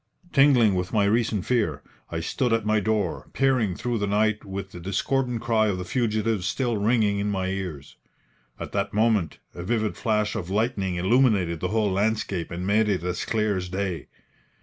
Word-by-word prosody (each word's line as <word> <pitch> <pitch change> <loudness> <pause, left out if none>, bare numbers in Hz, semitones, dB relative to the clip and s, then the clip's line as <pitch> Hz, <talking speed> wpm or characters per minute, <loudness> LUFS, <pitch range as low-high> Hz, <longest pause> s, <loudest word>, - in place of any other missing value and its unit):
Tingling 135 -7 +5
with 90 0 -2
my 105 -3 +2
recent 110 -2 +1
fear, 110 - 0 0.3
I 80 - -3
stood 120 +7 0
at 115 -2 0
my 110 0 +3
door, 105 -4 -1
peering 130 -9 +2
through 120 +2 -2
the 100 - -1
night 105 +1 +1
with 100 0 -6
the 90 - -9
discordant 120 +7 -1
cry 110 -2 +2
of 100 -3 0
the 90 - -5
fugitives 110 -3 0
still 120 +2 0
ringing 105 -1 +2
in 100 +1 -1
my 95 -2 -1
ears. 90 -7 -5 0.6
At - - -6
that - - -2
moment 105 -7 +2 0.2
a 85 - -7
vivid 110 +2 -1
flash 105 -2 0
of 95 -6 -4
lightning 100 -3 0
illuminated 95 -3 +2
the 90 - -1
whole 105 0 +1
landscape 100 -3 -1
and 90 +1 -5
made 105 +2 +2
it 95 -4 0
as 90 0 -2
clear 110 -2 0
as 90 0 -4
day. 95 -4 -3
105 Hz, 185 wpm, -25 LUFS, 95-110 Hz, 0.6 s, Tingling